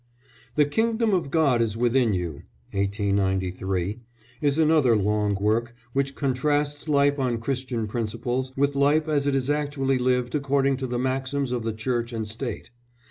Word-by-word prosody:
The 150 - +5
Kingdom 225 +6 +1
of 175 -7 0
God 140 -6 +3
is 110 -2 -1
Within 120 0 +3
You, 85 -5 -4 0.3
1893, 95 -1 -1 0.4
is 145 0 +2
another 155 -6 +4
long 105 0 +1
work 110 +4 0 0.2
which 140 0 0
contrasts 145 +2 0
life 145 0 +3
on 125 -3 0
Christian 125 -1 -2
principles 120 +4 -2
with 140 +1 +2
life 145 +3 +3
as 145 -2 +1
it 140 - +2
is 135 -1 0
actually 140 -3 0
lived 125 -1 +1
according 140 -2 +1
to 130 -1 -3
the 120 0 -2
maxims 130 +1 -1
of 120 -2 -2
the 115 -1 -2
Church 120 +1 -2
and 110 -2 -3
State. 115 +2 -6
130 Hz, 155 wpm, -25 LUFS, 115-140 Hz, 0.4 s, The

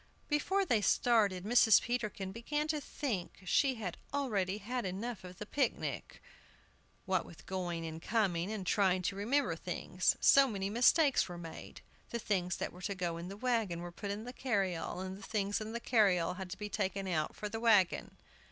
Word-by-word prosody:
Before 380 +7 +1
they 235 - +2
started, 205 -5 +3
Mrs. 220 0 +6
Peterkin 215 -5 -3
began 295 +8 -2
to 305 -1 0
think 220 -12 -4
she 265 +8 +3
had 200 -7 -5
already 210 -9 0
had 240 +4 -3
enough 200 +4 -4
of 180 -1 -10
the 210 - -6
picnic, 265 +3 -2 0.8
what - - +1
with - - -14
going 175 -3 -3
and 160 0 -6
coming, 190 -3 0
and 210 -4 -4
trying 185 -1 +2
to 195 - -1
remember 245 +9 +1
things. - - 0
So 275 0 +7
many 200 -4 -3
mistakes 265 - +4
were 175 - -6
made. 165 -1 -9 0.3
The 235 - -2
things 185 -5 -1
that - - -4
were 180 - -12
to 200 +2 -2
go 175 -3 -2
in 170 +1 -6
the 195 +2 -7
wagon 220 -8 0
were 175 0 -6
put 200 +4 -6
in 205 +2 -3
the 245 +1 -7
carryall, 190 -8 -1
and 190 +1 -6
the - - -13
things 205 0 -1
in 215 +1 -5
the 235 - -3
carryall 195 -8 +3
had 190 -2 -6
to 190 - -6
be 210 +1 -4
taken 195 -1 -2
out 155 -4 -1
for 210 - -4
the 225 +2 -4
wagon! 210 -6 +3
205 Hz, 190 wpm, -33 LUFS, 185-235 Hz, 0.8 s, So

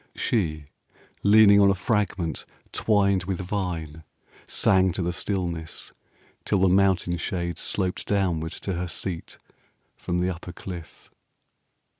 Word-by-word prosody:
She, 80 -10 -1 0.6
leaning 100 0 +7
on 100 - +6
a 100 - +3
fragment 95 -5 -1 0.3
twined 100 -4 +2
with 95 -1 -2
vine, 90 -5 -4 0.4
Sang 95 -2 +3
to 90 - -2
the 90 +1 -1
stillness, 85 -4 -3 0.5
till 105 - +1
the 95 0 +4
mountain 95 -2 +3
shade 85 -1 -3
20 - - -5
Sloped 95 -2 -2
downward 85 -6 0
to 95 - -4
her 90 +1 -3
seat 85 +1 -5 0.6
from 90 0 -2
the 90 +1 +1
upper 90 0 -8
cliff. 85 -4 -9
90 Hz, 130 wpm, -25 LUFS, 85-100 Hz, 0.6 s, leaning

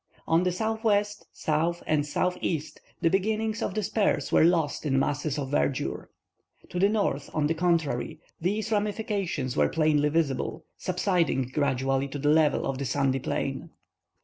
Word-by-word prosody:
On 165 +1 +4
the 180 0 +1
southwest, 210 +1 0
south, 165 +3 -1
and 150 -1 +2
southeast, 165 0 -2 0.2
the 165 - +4
beginnings 215 +3 0
of - - -2
the 215 - 0
spurs 205 +1 0
were - - +5
lost 165 -3 +2
in 135 -3 +1
masses 145 +2 0
of 140 -2 -3
verdure. 140 -2 -1 0.6
To 180 - -3
the 200 +2 +4
north, 200 -10 0
on 150 -2 +2
the 155 - +2
contrary, 165 -6 0 0.2
these 205 +6 -1
ramifications 205 - -1
were - - +3
plainly 155 -2 +2
visible, 150 -4 -1
subsiding 175 -8 0
gradually 135 -1 +1
to 140 - -6
the 145 +1 +1
level 155 -1 +3
of 135 -1 -2
the 140 - -2
sandy 135 0 +1
plain. - - -3
160 Hz, 155 wpm, -27 LUFS, 140-195 Hz, 0.6 s, were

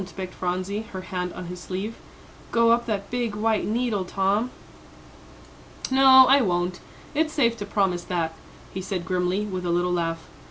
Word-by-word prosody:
begged 185 -1 -5
Phronsie, 185 +3 -2
her 185 - -4
hand 180 -1 -4
on 180 - -7
his 180 +1 -7
sleeve, 190 +5 -4 0.6
"go 230 0 +4
up 235 +1 +2
that 200 -3 -3
big 240 -3 -1
white 220 0 +1
needle, 225 -2 0
Tom." 195 +5 0 1.4
"No, 265 0 +8
I 275 +2 +6
won't; 180 -3 0 0.3
it's 310 +1 0
safe 235 -5 +2
to 205 - -6
promise 190 -4 0
that," 165 -3 -1 0.4
he 190 - -4
said 185 -2 -4
grimly, 180 +3 0
with 185 -3 -4
a 175 - -2
little 175 +1 +1
laugh. 165 -1 -1
195 Hz, 165 wpm, -25 LUFS, 180-230 Hz, 1.4 s, No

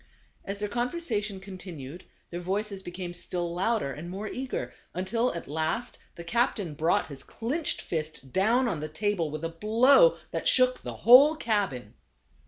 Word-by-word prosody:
As 195 +1 -4
their 210 +1 -2
conversation 235 - -2
continued 180 -5 -9 0.3
their 175 - -4
voices 195 +2 -2
be 185 - -7
came 175 0 -6
still 175 -1 -2
louder 195 -3 0
and 165 +5 -8
more 195 +4 -5
eager, 260 +4 -4 0.2
until 230 +7 0
at 170 - -6
last 160 - -2 0.2
the 170 - -8
captain 205 - 0
brought 160 +4 +1
his 140 -2 -10
clinched 285 +8 -2
fist 155 -5 -5
down 230 +7 +3
on 185 -9 -2
the 155 +1 -5
table 180 -1 -1
with 155 +2 -6
a 165 - -1
blow 235 - +5
that - - -2
shook 255 0 +3
the - - -6
whole 270 +7 +9
cabin. 200 - -1
195 Hz, 165 wpm, -28 LUFS, 170-235 Hz, 0.3 s, whole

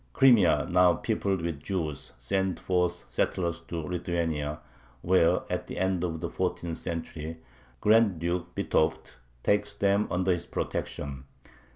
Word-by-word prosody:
Crimea, 100 - +5
now 90 -1 +5
peopled 95 +1 -1
with 85 -4 -3
Jews, 80 -6 -3
sends 95 +8 -1
forth 90 -2 0
settlers 85 +7 -1
to 85 -2 -4
Lithuania, 80 -3 -2 0.4
where, 90 -2 +4
at - - -3
the - - -6
end 95 -1 0
of 80 -2 -2
the 85 - -2
fourteenth 85 -2 -2
century, 80 -1 -5 0.4
Grand 110 -3 +4
Duke 85 +2 -3
Vitovt 80 -5 0 0.3
takes 105 0 +1
them 100 +1 +2
under 90 +1 +1
his 85 -1 -1
protection. 70 -2 -4
85 Hz, 135 wpm, -28 LUFS, 80-95 Hz, 0.4 s, Crimea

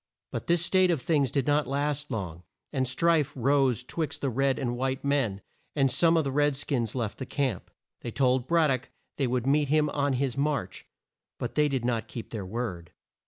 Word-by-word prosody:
But - - -5
this 170 0 +3
state 185 0 +4
of 170 -4 +2
things 140 -1 +1
did 135 +1 0
not 145 0 +2
last 145 +1 -1
long, 90 - -4 0.3
and 130 -2 0
strife 160 +2 +2
rose 130 -1 +2
twixt 150 +2 -4
the 135 - 0
red 135 +2 +1
and 120 -3 -2
white 130 +1 -2
men, 130 -9 +1 0.3
and 135 -3 +3
some 165 +4 +4
of 160 - +3
the 135 - -2
red 145 +1 +2
skins 130 -5 -2
left 115 -4 -3
the 130 - -4
camp. 130 -10 -2 0.3
They - - -5
told 130 +1 +1
Brad 165 -3 +3
dock 130 -1 -2 0.3
they 135 - +1
would 125 0 -1
meet 145 +2 +3
him 150 +1 +3
on 140 -1 0
his 130 -1 0
march, 140 -9 -2 0.5
but - - -4
they 150 0 +3
did 130 -4 -1
not 115 -2 -1
keep 115 - -8
their 105 -5 -5
word. 95 -6 -5
135 Hz, 205 wpm, -28 LUFS, 120-145 Hz, 0.5 s, state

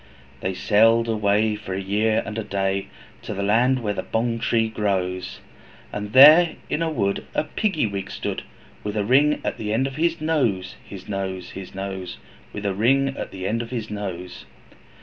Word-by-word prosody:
They 95 +5 -3
sailed 115 +4 +4
away 105 0 +2
for 95 -3 -6
a - - -2
year 105 +3 +1
and 105 - -6
a - - -3
day, 100 -1 -1 0.3
To - - -6
the 100 - -2
land 120 +5 +2
where 105 -1 0
the - - -3
Bong 115 +1 -1
tree 115 -1 +1
grows, 95 -4 -2 0.5
And 105 0 -5
there 155 +6 +8 0.2
in - - 0
the 165 -1 0
wood 100 -10 -1
a - - +2
Piggy 160 - -1
wig 100 -2 -4
stood, - - -4 0.4
With 105 +1 -3
a 105 - 0
ring 145 +6 +4
in - - 0
the 105 -1 -3
end 120 +5 +1
of 135 -1 -5
his 165 +1 +1
nose, 130 -13 0
His 95 -2 -11
nose, 95 -2 -4
His 95 -1 -9
nose! 95 -2 -5 0.3
With 105 0 -6
a 100 - +1
ring 135 +7 +3
in 135 - -5
the 95 -1 -7
end 115 +4 0
of 115 - -7
his 115 -4 -5
nose. 90 -4 -6
105 Hz, 190 wpm, -23 LUFS, 100-120 Hz, 0.5 s, there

